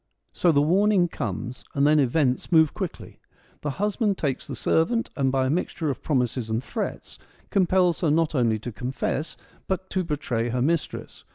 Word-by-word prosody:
So 175 - +3
the 145 -2 +3
warning 190 +3 +3
comes, 125 - -5
and 140 0 +3
then 150 +1 +5
events 130 0 +1
move 160 -3 +5
quickly. - - -6 0.4
The 150 - -2
husband 205 - 0
takes 140 -4 -2
the - - -5
servant, 230 +9 +1
and 135 -2 +1
by 130 -1 +1
a - - 0
mixture 160 -2 -1
of 130 - -7
promises 125 -5 0
and 110 +3 -1
threats - - -5 0.3
compels 185 -2 +3
her 165 - +2
not 160 +1 +2
only 120 -5 +2
to 115 +3 -6
confess, 130 +6 -3 0.3
but 190 0 -3
to 185 - 0
betray 130 -7 -2
her 125 +1 -1
mistress. 165 +2 -2
150 Hz, 175 wpm, -25 LUFS, 130-175 Hz, 0.4 s, then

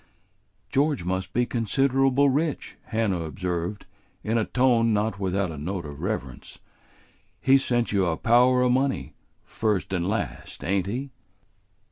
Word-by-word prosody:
"George 140 - +1
must 95 0 -2
be 120 +1 +1
considerable 135 +4 +2
rich," 145 +2 -1
Hannah 110 -6 -1
observed, 90 +3 -4 0.4
in 110 +2 -1
a 110 - 0
tone 120 -3 +3
not 105 -1 0
without 95 -1 -1
a 75 - -7
note 90 +2 -4
of 75 -1 -8
reverence; 85 - -5 0.8
"he's 135 +4 +4
sent 120 -1 0
you 100 -3 +2
a 80 -2 0
power 125 +2 +4
o' 125 - +3
money, 130 - 0 0.3
first 105 -4 -1
and 90 0 0
last, 100 - -4
ain't 95 +1 0
he?" 130 +6 -4
110 Hz, 140 wpm, -25 LUFS, 90-125 Hz, 0.8 s, he's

